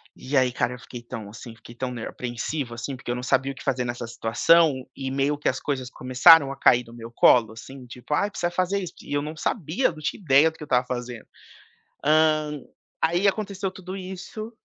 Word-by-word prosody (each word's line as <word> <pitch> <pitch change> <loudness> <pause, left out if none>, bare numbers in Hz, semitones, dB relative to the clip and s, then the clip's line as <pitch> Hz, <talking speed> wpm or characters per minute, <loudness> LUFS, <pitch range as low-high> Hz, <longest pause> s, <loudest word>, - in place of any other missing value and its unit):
E 135 +3 -5
aí, 130 -2 +4
cara, 125 0 -1
eu 125 - -10
fiquei 120 -1 -10
tão 115 -3 -8
assim, 115 +2 -11
fiquei 115 +1 -14
tão 130 +1 -4
ner 120 -3 -5
apreensivo 120 +2 -4
assim, 120 +4 -5
porque 125 - -10
eu - - -1
não 125 - -5
sabia 135 +1 +1
o - - -10
que - - -11
fazer 125 -2 -1
nessa 120 0 -4
situação. 145 +8 +3 0.2
E 135 -1 -4
meio 140 +2 0
que 150 - -3
as 130 - -2
coisas 130 -3 -3
começaram 135 +4 +6
a 140 - -8
cair 125 0 +5
no 115 - -14
meu 115 -1 -10
colo 115 -2 +4
assim 130 +3 -11
tipo: 125 +4 -7
"Ai, 200 +7 +1
precisa 175 -3 -2
fazer 185 +3 0
isso". 180 -4 -6
E - - -7
eu 145 - +1
não 155 +2 -6
sabia, 180 - 0
não 155 - -12
tinha 155 - -4
ideia 150 -1 +5
do 160 - -19
que - - -9
eu - - -7
estava 125 -3 +2
fazendo. 120 -2 -6 0.8
Hã, 155 -1 +3 0.4
aí, 175 +5 +2
aconteceu 195 -2 -2
tudo 185 0 -8
isso. 190 +4 -7
135 Hz, 225 wpm, -24 LUFS, 125-165 Hz, 0.8 s, começaram